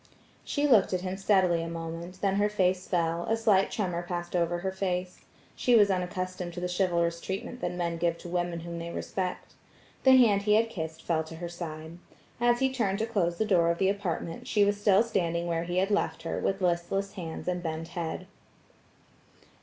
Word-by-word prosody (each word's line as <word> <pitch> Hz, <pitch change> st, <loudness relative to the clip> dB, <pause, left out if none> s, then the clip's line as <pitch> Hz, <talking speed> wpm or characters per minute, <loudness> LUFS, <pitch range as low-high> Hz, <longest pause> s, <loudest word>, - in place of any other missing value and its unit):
She 290 Hz, 0 st, 0 dB
looked 225 Hz, -8 st, +5 dB
at 180 Hz, -, 0 dB
him 185 Hz, 0 st, -3 dB
steadily 190 Hz, -3 st, +3 dB
a 165 Hz, -, -4 dB
moment, 165 Hz, +2 st, -6 dB
then 195 Hz, -1 st, +1 dB
her 205 Hz, +1 st, +3 dB
face 185 Hz, -3 st, +1 dB
fell; 170 Hz, -1 st, 0 dB
a 225 Hz, -, +2 dB
slight 210 Hz, -4 st, +3 dB
tremor 180 Hz, -5 st, -2 dB
passed 175 Hz, 0 st, -4 dB
over 175 Hz, 0 st, +1 dB
her 190 Hz, +1 st, -1 dB
face; 185 Hz, -1 st, -3 dB, 0.3 s
she 245 Hz, -, +3 dB
was 205 Hz, -3 st, +6 dB
unaccustomed 185 Hz, -1 st, -3 dB
to -, -, -4 dB
the 180 Hz, -, -2 dB
chivalrous 170 Hz, -2 st, +1 dB
treatment 195 Hz, +6 st, -5 dB
that -, -, -1 dB
men 170 Hz, -1 st, -2 dB
give 170 Hz, 0 st, 0 dB
to -, -, -10 dB
women 175 Hz, -1 st, -2 dB
whom 170 Hz, 0 st, -6 dB
they 170 Hz, 0 st, -5 dB
respect. 180 Hz, +1 st, -4 dB, 0.5 s
The 260 Hz, -1 st, +8 dB
hand 215 Hz, -6 st, +5 dB
he 210 Hz, +1 st, +3 dB
had 225 Hz, +1 st, +2 dB
kissed 160 Hz, -3 st, -5 dB
fell 160 Hz, -2 st, 0 dB
to 165 Hz, -, -9 dB
her 175 Hz, +1 st, -5 dB
side. 165 Hz, -1 st, -7 dB, 0.4 s
As 240 Hz, +1 st, +3 dB
he 265 Hz, 0 st, +2 dB
turned 205 Hz, -6 st, 0 dB
to 220 Hz, -, 0 dB
close 180 Hz, -7 st, 0 dB
the 220 Hz, -, +1 dB
door 175 Hz, -5 st, +3 dB
of 170 Hz, -, +1 dB
the 190 Hz, +1 st, +2 dB
apartment, 180 Hz, -4 st, -3 dB
she 205 Hz, -2 st, +3 dB
was 205 Hz, 0 st, 0 dB
still 205 Hz, 0 st, +5 dB
standing 170 Hz, -7 st, -1 dB
where 170 Hz, -1 st, -1 dB
he 175 Hz, +1 st, -2 dB
had 195 Hz, +3 st, +2 dB
left 165 Hz, -5 st, 0 dB
her, 165 Hz, -, -2 dB
with 195 Hz, 0 st, -1 dB
listless 185 Hz, +3 st, 0 dB
hands 170 Hz, -4 st, -6 dB
and 180 Hz, -1 st, -1 dB
bent 165 Hz, -1 st, -4 dB
head. 170 Hz, +1 st, -4 dB
180 Hz, 205 wpm, -29 LUFS, 170-200 Hz, 0.5 s, The